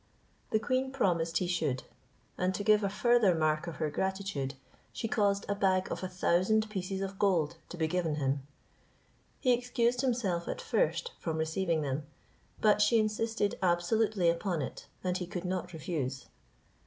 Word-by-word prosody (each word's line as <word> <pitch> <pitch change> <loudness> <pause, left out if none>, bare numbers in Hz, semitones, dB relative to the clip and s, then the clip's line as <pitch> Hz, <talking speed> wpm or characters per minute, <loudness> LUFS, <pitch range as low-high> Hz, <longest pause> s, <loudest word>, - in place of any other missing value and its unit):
The - - +3
queen 255 +4 0
promised 170 -10 +1
he 185 - 0
should; 170 -7 -1 0.5
and 185 +1 0
to 205 - -3
give 210 0 +4
a 200 - +1
further 215 -2 +4
mark 155 +1 +1
of 170 - -5
her 155 -2 -2
gratitude, 190 -7 -2 0.4
she 225 - -3
caused 200 -3 +1
a 200 - +1
bag 190 -2 +1
of - - -3
a 185 - -2
thousand 185 +4 +2
pieces 190 -1 -3
of 195 0 -4
gold 170 -5 +2
to 175 - -7
be 160 - +1
given 165 -2 0
him. 140 -1 0 1.0
He 255 - +4
excused 245 0 +1
himself 225 -10 0
at - - -3
first - - 0
from 160 -2 -2
receiving 160 0 0
them, 140 +1 -3 0.5
but 210 -1 +4
she 210 +2 +5
insisted 215 -1 0
absolutely 185 +2 +2
upon 170 -2 +1
it, - - -7 0.2
and 180 -1 0
he 180 - -4
could 180 0 -5
not 180 -1 -2
refuse. 140 -6 -3
185 Hz, 165 wpm, -31 LUFS, 165-215 Hz, 1.0 s, she